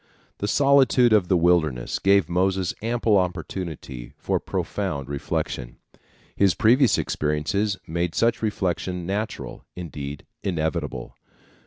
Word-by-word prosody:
The 100 - -1
solitude 135 -2 +4
of 100 -5 +4
the 90 - +3
wilderness 80 -8 +2
gave 100 -3 +4
Moses 95 +1 +1
ample 115 -2 +2
opportunity 85 -8 -5
for - - -1
profound 70 -1 -3
reflection. 65 -3 -3 0.6
His 100 -2 +3
previous 125 +2 +4
experiences 95 +8 0
made 85 +1 -2
such 115 0 +2
reflection 90 -4 -2
natural, 105 +4 -4
indeed 75 -4 -6 0.2
inevitable. 80 -4 -2
90 Hz, 110 wpm, -24 LUFS, 80-105 Hz, 0.6 s, solitude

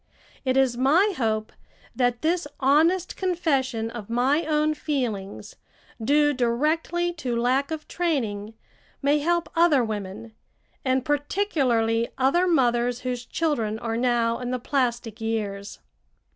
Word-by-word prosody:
It 260 -1 +1
is 260 -3 +2
my 330 +11 +3
hope 215 -4 -1 0.4
that 245 0 0
this 335 0 +1
honest 320 +7 +3
confession 270 - -1
of 230 -3 -8
my 270 +7 +1
own 305 0 +2
feelings, 220 -9 -4 0.5
due 295 +4 +3
directly 310 +8 0
to 260 -8 -3
lack 260 +4 +1
of 315 -1 -5
training, 225 -11 -2 0.5
may 290 +2 +3
help 340 +3 0
other 330 -6 +4
women, 215 +1 -5 0.5
and 260 -1 +1
particularly 270 - +1
other 310 +8 +3
mothers 245 -6 +2
whose 250 -1 -4
children 235 -10 -1
are 225 0 -3
now 235 -1 +1
in 250 -1 -4
the 255 - -1
plastic 240 -3 -2
years. 210 -3 -3
255 Hz, 125 wpm, -25 LUFS, 230-305 Hz, 0.5 s, other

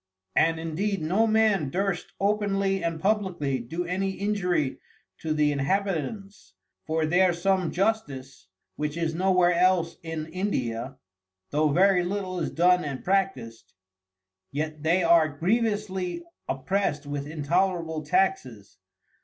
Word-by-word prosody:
And 165 0 +3
indeed 185 +5 -2
no 190 +9 +2
Man 215 -8 +2
durst 190 +3 -2
openly 195 -2 0
and 165 -1 -2
publickly 185 -9 0
do 165 +10 -4
any 190 +2 -1
injury 180 -8 -1 0.4
to 160 - -3
the 150 -1 +2
Inhabitants; 195 - -2 0.3
for 160 0 +1
there 180 +3 +4
some 185 0 +1
Justice, 145 - -2 0.3
(which 150 +1 -3
is 165 -1 -1
no 185 +3 +1
where 180 -1 +4
else 175 -2 +2
in 160 -1 -5
India) 130 - -2 0.5
though 150 +1 +2
very 180 +4 +4
little 185 0 -3
is - - -1
done 180 +1 +3
and 140 -3 -5
practiced; 190 -12 -2 0.8
yet 155 +1 -3
they 170 +4 +2
are 165 -2 +5
grievously 205 - -1 0.3
opprest 150 +1 -1
with 145 0 -4
intolerable 165 +1 -1
Taxes. 130 - -1
175 Hz, 125 wpm, -26 LUFS, 150-195 Hz, 0.8 s, are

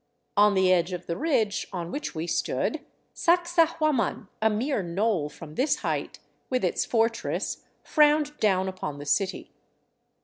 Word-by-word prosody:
On 205 0 +5
the 190 -1 +4
edge 175 0 +1
of 175 0 -5
the 170 - -3
ridge 255 -10 0
on 175 -3 -5
which 295 - -4
we 160 +1 -3
stood, 170 - -1 0.3
Sacsahuaman, 330 - +1
a 220 - +4
mere 225 +3 0
knoll 180 -2 0
from 150 0 -11
this 265 - +2
height, - - -2 0.3
with 255 -1 0
its - - 0
fortress, 230 0 -1 0.2
frowned 300 -1 +3
down 190 -3 +2
upon 185 -6 -5
the 145 - -8
city. 185 +7 -1
210 Hz, 145 wpm, -26 LUFS, 180-290 Hz, 0.3 s, On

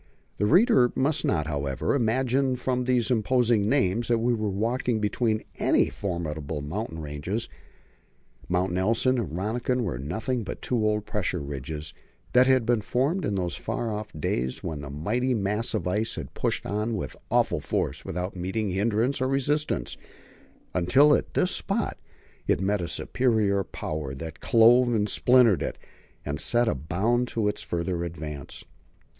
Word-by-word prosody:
The 105 - +1
reader 175 - +5
must 145 +3 +1
not, 75 -3 +1
however, 70 -3 -1
imagine 130 +2 +1
from 125 0 -1
these 125 0 +1
imposing 115 -2 +2
names 120 -4 +1
that 120 - +3
we 120 +2 +1
were 110 -2 -1
walking 115 +3 0
between 110 +1 0 0.2
any - - +3
formidable 80 -5 -4
mountain 80 +2 -5
ranges. 75 +10 -4 1.0
Mounts 90 0 +1
Nelson 115 +7 +2
and 105 -9 -2
Rönniken 120 +6 -1
were 90 - -2
nothing 110 - -2
but 95 - -6
two 120 -3 0
old 105 -1 +1
pressure 95 -3 -1
ridges 75 +1 -5 0.4
that 125 +1 +6
had 130 -3 +4
been 120 -1 +2
formed 140 - 0
in 100 - -1
those 90 -2 -1
far 115 -2 -3
off 105 0 -4
days 65 -3 -2
when 80 -4 -4
the 70 - -7
mighty 120 - 0
mass 105 +2 -1
of 95 -4 -2
ice 105 +5 0
had - - -7
pushed - - -1
on 105 +3 -1
with 95 - -4
awful - - +2
force - - -2
without 90 +2 -4
meeting 95 +3 -2
hindrance 110 +7 +1
or 130 - +2
resistance, 140 +3 0 0.8
until 130 +12 +5
at - - -1
this 180 - +2
spot 200 +2 -2 0.5
it - - +2
met 100 +1 0
a 85 - -3
superior 105 -1 +1
power 75 -6 -5
that 80 +3 -7
clove 120 +2 +5
and 105 -2 +1
splintered 125 -6 +4
it, - - -3 0.5
and 70 0 -3
set 120 +5 +2
a - - +2
bound 105 - 0
to 110 -3 -1
its 105 - -1
further 85 0 -2
advance. 75 -4 -7
105 Hz, 160 wpm, -26 LUFS, 90-125 Hz, 1.0 s, that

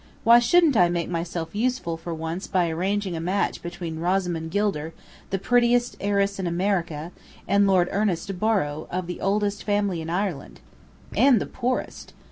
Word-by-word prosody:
Why 235 +1 +8
shouldn't 315 +4 +4
I 180 -4 +5
make 170 -1 -2
myself 165 -1 -3
useful 225 -6 -1
for 165 +1 -7
once 165 +3 -4
by 180 -3 +1
arranging 190 +2 -1
a - - -3
match 185 +5 -1
between 170 -2 -6
Rosamond 175 -2 -1
Gilder, 165 -5 -1 0.3
the 195 - 0
prettiest 240 +3 +2
heiress 200 0 0
in 185 - -1
America, 170 -3 -1 0.4
and 200 +1 +4
Lord 185 -2 +3
Ernest 195 -2 -1
Borrow, 180 -9 0
of 185 0 -3
the 180 +1 -6
oldest 205 +1 0
family 205 -4 0
in 160 - -6
Ireland?" 180 -4 -3 0.6
"And 250 0 +5
the - - -3
poorest." 250 0 -3
190 Hz, 160 wpm, -24 LUFS, 170-205 Hz, 0.6 s, Why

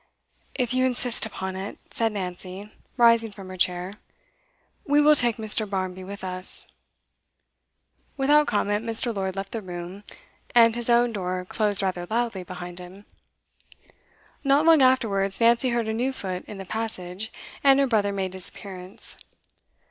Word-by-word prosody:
'If 250 -2 -1
you 255 0 +2
insist 245 -3 +3
upon 190 -3 -5
it,' 190 +2 -6
said 225 -1 0
Nancy, 185 +1 -6 0.3
rising 230 -1 +5
from 195 -2 -11
her 185 - -7
chair, 180 +1 0 0.9
'we 290 0 +3
will 300 +1 +6
take 240 -6 +4
Mr. 215 -1 +1
Barmby 185 -1 -3
with 200 +1 -8
us.' 185 0 -2 1.5
Without 295 +2 +4
comment, 205 0 0
Mr. 230 0 +1
Lord 190 -1 -2
left 195 0 -5
the 225 - -4
room, 180 +1 -8 0.5
and 230 -1 +7
his 240 0 0
own 240 0 +4
door 180 -2 -3
closed 205 0 +2
rather 180 -2 -2
loudly 230 -4 -1
behind 180 0 -8
him. 185 +3 -12 1.4
Not 280 +2 +3
long 325 -3 +6
afterwards 205 -7 +2
Nancy 235 +2 +4
heard 235 -2 -1
a 220 - -1
new 245 +4 0
foot 185 -8 -5
in 210 - -8
the 195 - -7
passage, 215 -1 -4 0.3
and 275 -1 +6
her 280 - +4
brother 210 -5 +1
made 190 -2 -3
his 185 -1 0
appearance. 185 -1 -7
205 Hz, 155 wpm, -25 LUFS, 185-235 Hz, 1.5 s, and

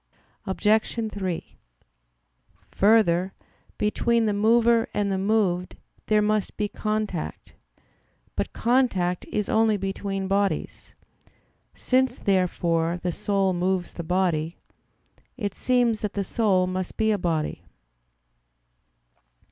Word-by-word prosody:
Obj. 215 +3 +1
3: 185 -4 -4 1.1
Further, 195 -3 +3 0.4
between 230 +2 +1
the 210 - +1
mover 230 +2 +3
and 205 -1 0
the 190 - 0
moved 190 -3 0 0.3
there 210 -1 +3
must 215 -1 0
be 210 - 0
contact. 215 - -4 0.8
But - - -2
contact 225 -8 +1
is 210 -1 -2
only 220 -1 +3
between 195 0 -3
bodies. 200 0 -2 0.8
Since, 260 0 +1
therefore, 175 -3 +1
the 180 - 0
soul 195 +1 0
moves 180 0 -1
the 170 - -6
body, 170 -2 0 0.8
it 205 -5 -3
seems 240 -3 +1
that 210 - -3
the 200 - -1
soul 195 -3 +2
must 185 0 -4
be 220 -1 +2
a 205 - 0
body. 160 -3 -2
200 Hz, 110 wpm, -25 LUFS, 185-220 Hz, 1.1 s, Further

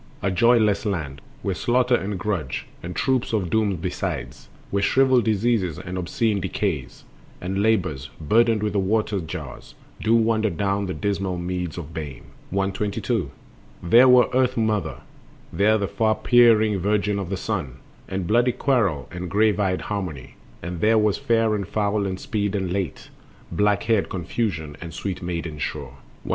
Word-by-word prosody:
A 95 - +1
joyless 110 +1 +3
land, 80 - -3 0.2
Where 100 - 0
Slaughter 125 +5 +1
and 100 -4 0
Grudge, 90 - -3 0.2
and 90 +1 -6
troops 130 -3 0
of 95 -6 0
Dooms 105 -4 +1
besides, - - -4 0.2
Where 100 - +1
shriveled 130 +2 +3
Diseases 110 -6 +1
and 90 0 -6
obscene 100 +3 0
Decays, - - -3 0.4
And 95 +2 -2
Labors, 95 -11 0
burdened 110 +6 +3
with 105 -2 -1
the 100 - +2
water 105 +1 0
jars, 80 -5 -8 0.3
Do 110 +1 +3
wander 110 -1 +2
down 100 +2 -1
the 95 - -3
dismal 100 -3 -2
meads 90 -1 -3
of 80 -2 -7
Bane. 75 -5 -6 0.3
122. 100 - -1 0.5
There 120 +9 +6
was 125 -1 +7
Earth 130 -1 +2
mother, 105 -7 -1 0.5
There 110 +2 +3
the 100 -2 -1
far 110 +2 +1
peering 110 -5 +4
Virgin 105 +1 0
of 95 -3 -4
the 95 - -2
Sun, 90 - -3 0.3
And 95 -1 -3
bloody 120 +6 +3
Quarrel 110 - +1
and 90 0 -5
grave 105 +2 +2
eyed 95 -2 0
Harmony, 90 -10 -5 0.3
And 85 -1 -5
there 110 +1 +4
was 105 -2 +2
Fair 115 -2 +2
and 100 -3 -2
Foul 105 -1 0
and 95 -1 -4
Speed 105 -1 -2
and 95 -3 -1
Late, 95 -3 -4 0.4
Black 105 0 +2
haired 110 -3 +1
Confusion 85 -5 -3
and 85 -1 -8
sweet 95 -3 -4
maiden 85 -3 -4
Sure. - - -4 0.3
123. - - -9
100 Hz, 160 wpm, -23 LUFS, 90-110 Hz, 0.5 s, was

